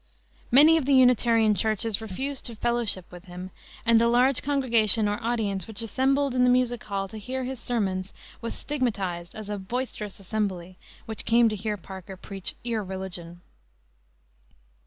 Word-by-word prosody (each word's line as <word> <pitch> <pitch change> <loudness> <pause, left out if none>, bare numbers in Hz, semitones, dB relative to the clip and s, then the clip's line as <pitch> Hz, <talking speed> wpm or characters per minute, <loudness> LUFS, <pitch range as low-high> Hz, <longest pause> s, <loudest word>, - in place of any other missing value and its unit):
Many 300 +6 +7
of 285 -4 -2
the 280 - +5
Unitarian 235 -4 +5
churches 220 0 0
refused 265 +7 -4
to 235 - -3
"fellowship" 235 -5 -1
with 180 +1 -11
him; 180 +1 -8 0.3
and 230 -1 +5
the 235 - +4
large 250 +2 +4
congregation, 230 -7 +2
or 205 0 -1
audience, 210 -6 -1
which 220 0 -3
assembled 270 +4 +1
in 250 0 +4
Music 245 -2 +1
Hall 195 -1 -2
to 220 - -7
hear 260 +5 -4
his 260 0 -5
sermons 195 -6 -2 0.3
was 230 - -4
stigmatized 195 -11 -3
as 215 -2 -7
a 205 -1 -3
"boisterous 210 -1 -4
assembly" 190 -3 -3 0.3
which 220 -1 -6
came 235 0 +4
to 215 - -3
hear 210 +1 -3
Parker 190 0 -9
preach 195 0 -5
irreligion. 190 -6 -4
220 Hz, 155 wpm, -26 LUFS, 195-245 Hz, 0.3 s, Many